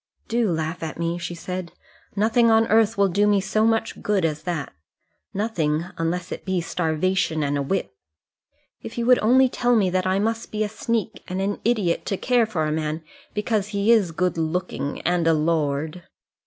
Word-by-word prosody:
"Do 230 -2 +1
laugh 160 +1 -2
at 160 -1 -5
me," 170 +1 -2
she 175 0 -5
said. 180 0 -6 0.4
"Nothing 230 +3 +3
on 225 0 +5
earth 220 0 +3
will 200 0 +4
do 200 +3 +2
me 205 -1 +4
so 215 +3 +1
much 225 0 0
good 200 -4 +1
as 155 -1 -1
that; 170 -5 -4 0.6
nothing, 170 -7 -1
unless 170 +2 -2
it - - -5
be 190 -1 0
starvation 165 -1 0
and 145 0 0
a 140 - 0
whip. 140 - -2 0.9
If - - -9
you 235 - 0
would 250 0 +6
only 260 +4 +5
tell 245 -1 +1
me 195 -5 +2
that 185 0 0
I 190 +1 +2
must 225 +3 -1
be 215 0 0
a 210 - -2
sneak 220 -1 -2
and 185 +1 -3
an 200 +1 -1
idiot 210 -7 +1
to 195 - -1
care 245 0 +2
for 170 -8 -1
a 155 - -1
man 155 +1 -2 0.3
because 210 -1 0
he 205 +1 +1
is 210 -7 +4
good 175 0 -1
looking 160 -4 -2
and 175 -1 +1
a 165 - +5
lord!" 155 +1 0
185 Hz, 195 wpm, -23 LUFS, 165-215 Hz, 0.9 s, would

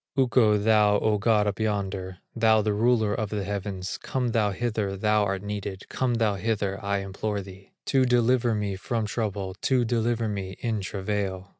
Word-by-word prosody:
Ukko, 120 -5 +4
thou 105 -1 +4
O 105 -1 +1
God, 105 -1 +3
up 105 +1 -2
yonder, 95 -3 -2 0.2
Thou 110 -2 +4
the 105 0 +1
ruler 110 -1 +2
of 110 -1 -2
the 105 -2 -2
heavens, 100 -1 -4
Come 125 -2 -1
thou 110 -2 +2
hither, 105 -2 -2
thou 105 +1 +2
art 100 0 -2
needed, 100 -2 -5
Come 125 -2 0
thou 110 -3 +2
hither, 100 -1 -2
I 100 0 0
implore 100 +1 -3
thee, 95 0 -13 0.2
To 135 -2 +3
deliver 120 -1 +3
me 105 -2 -2
from 115 +3 -2
trouble, 100 -2 -3
To 125 -3 +2
deliver 115 0 0
me 95 -2 -4
in 110 -3 -1
travail. 95 -1 -3
105 Hz, 175 wpm, -26 LUFS, 100-115 Hz, 0.2 s, Ukko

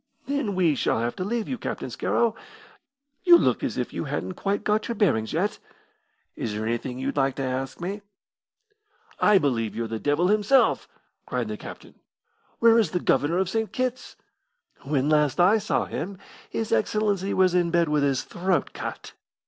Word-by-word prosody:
"Then 280 -8 -1
we 175 -4 +3
shall 135 - 0
have 120 +1 -2
to 185 - -2
leave 225 +3 -2
you, 255 - -4
Captain - - -5
Scarrow. 230 -2 +1 0.9
You 350 -2 +8
look - - +1
as - - -2
if - - -3
you - - -3
hadn't 185 - -3
quite 200 +3 -2
got 210 0 +1
your 235 - -3
bearings 135 - +1
yet. 190 +6 -1 0.8
Is 110 - -3
there 105 +1 -3
anything 120 +2 -3
you'd 135 +2 -3
like 135 -1 +2
to 135 - -3
ask 130 +1 -3
me?" 195 +4 -4 1.2
"I 210 -1 +5
believe 120 - 0
you're 115 0 -2
the 110 0 -4
devil 145 +8 +1
himself!" 215 +6 +3 0.4
cried - - -2
the - - -3
captain. - - -11 0.6
"Where 230 0 +5
is 220 - +2
the 180 - -1
Governor 165 0 +1
of 190 0 +1
St. 220 0 -1
Kitt's?" 255 0 -3 0.7
"When 140 -1 0
last 150 -1 +2
I 195 +5 +5
saw 210 - 0
him 195 +3 -5 0.3
his 225 -1 -3
Excellency 200 - +1
was 185 -1 +3
in 175 -1 +2
bed 170 0 +2
with 150 -1 +1
his 140 -2 +1
throat 180 0 -1
cut. - - -7
180 Hz, 180 wpm, -25 LUFS, 135-210 Hz, 1.2 s, You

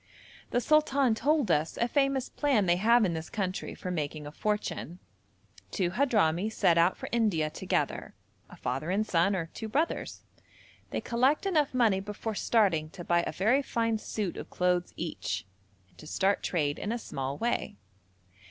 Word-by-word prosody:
The 245 - +1
sultan 280 -3 +3
told 285 +3 +1
us 150 +2 +1
a 235 - +1
famous 275 0 +1
plan 270 -9 +1
they 175 0 +3
have 230 +3 +4
in 175 - 0
this 160 0 -5
country 190 -3 -3
for 180 - -5
making 150 -2 -3
a 145 - -7
fortune. 210 -2 -3 0.7
Two 175 - -1
Hadhrami 210 - +2
set 170 -5 +3
out 170 +2 +3
for - - -6
India 195 -10 +1
together, - - -2 0.3
a - - -12
father 135 +6 -3
and 205 +4 +1
son, 185 +1 +2
or 170 -3 -2
two 220 - -5
brothers. 305 +8 -2 0.7
They - - -3
collect 260 +8 +1
enough 305 -9 +1
money 225 -6 +3
before 210 +3 -5
starting 195 -8 +2
to 175 - -9
buy 170 0 +2
a - - -2
very 230 +9 +2
fine 230 -4 -1
suit 210 -4 -3
of - - -7
clothes 180 -1 0
each, - - -3 0.4
and - - -24
to 155 - -11
start 195 +5 +1
trade 145 -5 -1
in 205 - -3
a 235 - -1
small 135 - -4
way. 240 - -2
205 Hz, 170 wpm, -29 LUFS, 170-240 Hz, 0.7 s, have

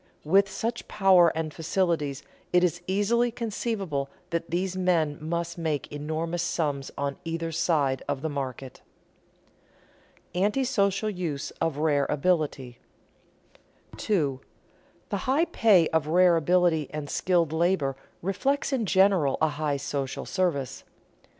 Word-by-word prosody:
With 195 +5 +4
such 230 +5 -4
power 190 -4 +5
and 155 -2 -3
facilities 160 -5 -1 0.3
it 180 0 +4
is 175 0 +1
easily 215 +5 +2
conceivable 210 - -3 0.2
that 170 0 -2
these 185 +2 -1
men 170 -5 +1
must 170 +1 -3
make 155 -3 -2
enormous 160 +3 -3
sums 145 -6 -1
on 140 -1 -2
either 165 0 -3
side 145 -5 +1
of 135 - -3
the - - 0
market." 135 -3 -5 1.5
[Sidenote: 180 +2 +2
Antisocial 210 -4 +1
use 165 -7 -4
of 165 -3 0
rare 145 -2 +2
ability] 145 -6 0 1.2
2. 145 -10 0 0.7
_The - - 0
high 295 +6 +3
pay 200 - +4
of 160 -2 0
rare 175 +2 +5
ability 165 -2 +2
and 150 -1 -5
skilled 170 -1 +1
labor 160 -5 +1 0.3
reflects 270 +10 0
in 235 -6 0
general 190 -8 +3
a 160 - +3
high 150 -1 -1
social 140 -1 -4
service. 170 -9 -1
165 Hz, 125 wpm, -27 LUFS, 145-190 Hz, 1.5 s, power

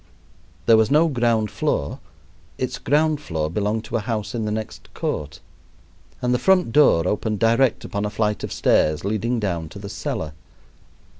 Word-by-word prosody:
There 115 - +6
was 110 0 +3
no 155 +3 +4
ground 115 -6 +1
floor 100 - -1 0.6
its - - -3
ground 150 +2 +1
floor 80 - -3
belonged 105 +3 -1
to 120 - -2
a - - -1
house 110 +1 -3
in 115 -2 -2
the 105 - -2
next 110 0 -6
court, 75 +1 -4 0.8
and 125 0 +2
the 125 - +1
front 185 -5 +3
door 100 - +4
opened 105 +2 -1
direct 115 +3 +2
upon 100 0 -3
a - - -1
flight 105 0 -1
of - - -4
stairs 75 +3 +2
leading 110 +4 0
down 85 -6 -2
to - - -11
the 100 0 -7
cellar. 80 -5 -4
110 Hz, 170 wpm, -22 LUFS, 100-120 Hz, 0.8 s, There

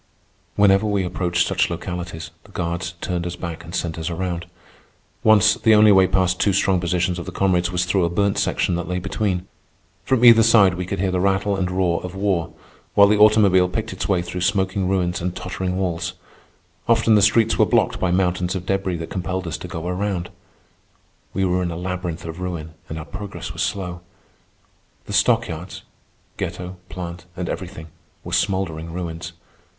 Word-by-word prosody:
Whenever 100 +1 +4
we 100 -2 +1
approached 90 -1 0
such - - +1
localities, 85 -3 -5
the 105 - -17
guards 85 -1 -3
turned 90 -1 -2
us 90 - -5
back 85 -2 -6
and 85 +1 -8
sent 80 -2 -2
us 80 - -3
around. 85 0 -3 0.8
Once, 110 -3 +6
the 110 -1 +4
only 105 0 +7
way 95 -1 +6
past 90 -1 +1
two 100 - +2
strong 95 -1 +2
positions 90 0 0
of 85 - -7
the - - -4
comrades 90 -2 +1
was 90 0 0
through 90 0 +1
a 85 - +1
burnt 100 +3 +1
section - - 0
that 85 0 -2
lay 90 0 -2
between. 90 0 -2 0.6
From 125 +2 +2
either 115 -1 +9
side 110 -4 +5
we 90 0 -4
could 100 0 -3
hear 95 0 0
the 90 - 0
rattle 100 +1 +1
and 95 -2 -1
roar 90 -2 0
of 90 +1 -6
war, 95 -4 0 0.4
while 100 0 +7
the 105 0 +3
automobile 100 -4 +5
picked 110 +3 -3
its - - -4
way 90 -3 +2
through 90 +1 -5
smoking 95 0 0
ruins 90 -2 0
and 90 +1 -3
tottering 90 0 -3
walls. 90 -1 -2 0.7
Often 115 -1 +4
the 105 - +5
streets 110 +2 +3
were - - +6
blocked - - +2
by 95 - +1
mountains 90 0 0
of 90 -1 -4
debris 95 -2 -1
that 80 0 -7
compelled 95 0 -3
us 80 - -3
to - - -7
go 85 0 -5
around. 90 -1 -2 1.0
We 95 0 0
were 90 0 +1
in 90 - -1
a 85 - -5
labyrinth 90 -2 -4
of 80 +1 -7
ruin, 85 -3 -5 0.2
and 80 - -5
our 75 - -6
progress 100 +1 -7
was - - -5
slow. 90 -3 -3 1.0
The - - -7
stockyards - - 0 0.5
(ghetto, 90 +1 -5
plant, 85 -1 -7
and 90 -1 -3
everything) 85 -3 -6 0.3
were - - -7
smouldering 85 -5 -1
ruins. 85 -1 -5
90 Hz, 185 wpm, -22 LUFS, 85-95 Hz, 1.0 s, either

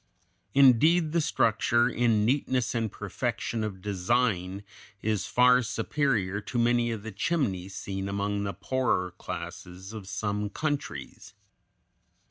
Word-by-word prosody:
Indeed, 150 +5 +5
the 170 +1 +2
structure, 120 -3 +2
in 115 -4 +2
neatness 130 -1 +1
and 115 -3 -1
perfection 115 -2 -3
of 95 -4 -5
design, 100 -1 0 0.4
is 105 -3 0
far 125 +1 +5
superior 115 -4 -1
to 120 - -5
many 120 0 +3
of 110 -3 -4
the 110 - -6
chimneys 100 - -1
seen 95 -1 -4
among 100 +1 -1
the 100 -1 -3
poorer 100 -2 0
classes 90 +4 -8
of 105 -4 -8
some 105 +1 -2
countries. 140 -7 -4
110 Hz, 120 wpm, -28 LUFS, 100-125 Hz, 0.4 s, Indeed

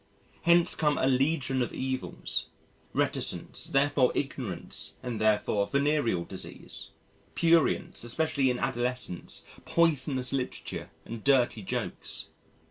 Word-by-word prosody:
Hence 170 +1 +5
come 150 -2 +2
a - - +2
legion 135 0 +2
of 120 - -1
evils: 130 0 -2 0.4
reticence, - - 0
therefore 140 -2 +3
ignorance 130 -9 -4
and 120 -4 -3
therefore 105 -1 +2
venereal 140 - +1
disease; - - -8 0.5
prurience 165 -7 +3
especially 135 +2 +1
in 125 - 0
adolescence, 120 -8 -2 0.2
poisonous 140 -6 +2
literature, 130 -2 -3 0.2
and 115 -1 -7
dirty 125 -5 +3
jokes. 95 - -4
130 Hz, 105 wpm, -29 LUFS, 120-145 Hz, 0.5 s, Hence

